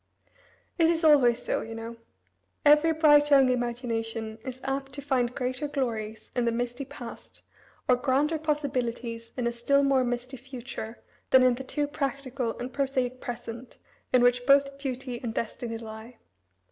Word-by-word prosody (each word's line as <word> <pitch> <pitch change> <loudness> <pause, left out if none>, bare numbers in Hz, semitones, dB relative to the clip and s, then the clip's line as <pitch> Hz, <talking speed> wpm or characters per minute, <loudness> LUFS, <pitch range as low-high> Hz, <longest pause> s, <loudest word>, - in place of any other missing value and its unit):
It 325 -1 +5
is 335 0 +1
always 275 -7 +5
so, - - -1
you 225 0 -7
know. 225 +1 -6 0.7
Every 300 +2 +6
bright 295 -2 +5
young 270 -3 +6
imagination 230 -2 -2
is 255 0 -6
apt 270 0 -3
to 280 - -5
find 250 -3 0
greater 255 +2 -2
glories 225 -6 -3
in 245 -1 +1
the 235 - +2
misty 245 +3 -3
past, 260 -4 -11 0.4
or 250 - +6
grander 285 +5 +1
possibilities 250 -6 -2
in 250 - -1
a 235 - +1
still 280 +4 +2
more 270 -2 +3
misty 245 +2 -3
future 245 -3 -7 0.3
than 260 -1 +7
in 255 -1 +5
the 255 +2 -5
too 295 +2 -1
practical 275 -4 -3
and 250 +1 -6
prosaic 260 -2 -1
present 240 0 -7 0.3
in 250 -1 +5
which 245 0 +3
both 275 0 +4
duty 260 -2 -4
and 235 -2 -4
destiny 230 0 -3
lie. 225 +1 -10
255 Hz, 160 wpm, -28 LUFS, 235-275 Hz, 0.7 s, than